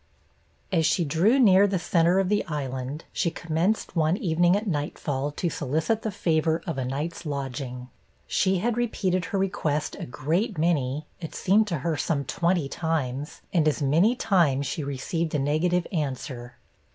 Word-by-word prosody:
As 165 -4 +2
she 175 - +2
drew 170 - +3
near 200 -5 +6
the 195 -1 0
center 175 +1 +2
of 195 -1 +2
the 210 +2 +1
Island, 135 -1 -4
she 170 - +1
commenced, 170 +7 -1
one 160 +2 +2
evening 175 -4 +3
at 210 +2 -1
nightfall, 145 -4 -2
to 175 - -2
solicit 160 - -1
the 220 - -2
favor 165 -5 0
of 165 -7 -3
a 130 - -1
night's 150 +7 -4
lodging. 135 -4 -4 0.4
She 190 -1 +1
had 230 +5 0
repeated 190 -7 0
her 200 - -2
request 160 -6 -1
a - - -5
great 170 - -1
many, 155 -3 0
it 165 -3 -7
seemed 210 +3 +3
to 170 -5 -1
her 165 -3 0
some 140 -3 -1
twenty 170 0 0
times, 145 -3 -3
and 165 -4 +3
as 150 -1 +1
many 170 - +3
times 165 - +2
she 155 +2 -3
received 150 +4 -2
a - - +3
negative 155 +5 +1
answer. 130 -6 -4
165 Hz, 165 wpm, -26 LUFS, 145-185 Hz, 0.4 s, near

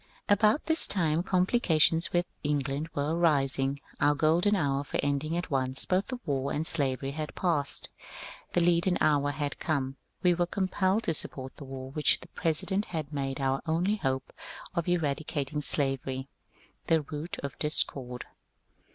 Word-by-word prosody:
About 210 +6 +3
this 320 0 +6
time 165 -4 +1
oomplioations 180 -4 +2
with 175 0 +1 0.2
England 145 +1 -2
were 145 +3 -1
arising; 140 -4 +1 0.2
our 145 0 +3
golden 170 +7 +2
hour 140 -5 0
for - - -4
ending 145 +3 -1
at 175 -2 -4
once 130 -1 +1
both 185 +2 0
the 255 -2 -5
war 140 -3 -1
and 155 +2 -2
slavery 135 -4 +2
had 155 +1 -6
passed. 160 -6 +1 0.7
The 175 - +2
leaden 175 +1 +3
hour 145 -1 +2
had 145 0 -4
come; 135 -4 -2 0.3
we 180 -1 +5
were 175 0 0
compelled 190 +3 0
to 165 - 0
support 130 -3 -3
the 140 - -9
war 130 0 -8
which 150 +1 +2
the 170 - -13
President 180 +6 0
had 155 -3 -5
made 135 -1 -3
our 135 0 0
only 180 +6 +1
hope 130 -7 -3 0.4
of 170 -2 -2
eradicating 150 -3 -1
slavery, 135 -2 +1 0.6
the 160 -1 +3
root 150 +3 -6
of 140 - -6
discord. 130 -5 +2
150 Hz, 155 wpm, -28 LUFS, 140-175 Hz, 0.7 s, this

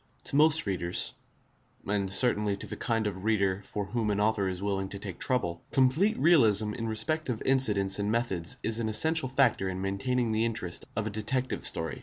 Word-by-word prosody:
To - - -4
most 155 +2 +5
readers, 90 -3 -2 0.7
and 100 -1 -1
certainly 105 -1 +1
to - - -6
the - - -6
kind 115 -2 -1
of 95 -2 -4
reader 100 -3 +1
for 100 +1 -4
whom 110 +2 -2
an 100 -1 0
author 105 -2 +1
is 90 -1 -5
willing 95 -1 -2
to 100 - -5
take 100 -3 -7
trouble, 85 -10 -1
complete 150 - +2
realism 110 - +4
in 115 - -4
respect 155 +8 -2
of 115 -3 -3
incidents 105 -8 +2
and 100 +1 -1
methods 95 -8 -1
is 110 0 -1
an 110 -1 -1
essential 155 +5 +3
factor 130 -8 +2
in 95 0 -5
maintaining 110 +5 -1
the 110 +1 +1
interest 110 -7 -2
of 105 0 -2
a 110 - -3
detective 125 +5 -2
story. 80 -1 -2
110 Hz, 195 wpm, -28 LUFS, 100-125 Hz, 0.7 s, most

